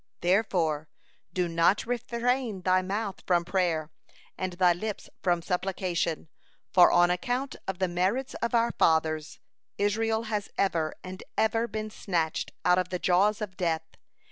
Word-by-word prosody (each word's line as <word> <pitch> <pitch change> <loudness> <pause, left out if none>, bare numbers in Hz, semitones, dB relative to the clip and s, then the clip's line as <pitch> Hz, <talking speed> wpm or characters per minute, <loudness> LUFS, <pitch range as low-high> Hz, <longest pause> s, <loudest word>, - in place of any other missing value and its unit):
Therefore, 175 -5 +1 0.4
do 180 0 0
not 170 +4 +2
refrain 240 -2 -1
thy 185 0 +3
mouth 200 +2 -3
from 175 -2 +3
prayer, 170 -4 0 0.4
and 185 -1 -3
thy 175 0 +4
lips 210 +4 -5
from 175 -2 +1
supplication, 180 -3 -1 0.5
for 180 -2 +7
on 175 0 +5
account 245 +9 -2
of 190 - -2
the 185 0 +1
merits 190 +10 0
of 235 +1 0
our 235 0 +3
fathers, 160 -1 +1 0.4
Israel 220 +2 +1
has 210 -2 -3
ever 165 -5 0
and 185 0 -8 0.2
ever 225 +2 +2
been 215 0 -5
snatched 170 -7 -2
out 180 0 +5
of 180 -1 -2
the 180 - -2
jaws 200 +5 +2
of 195 -3 -5
death. 165 -3 -1
185 Hz, 145 wpm, -28 LUFS, 175-215 Hz, 0.5 s, for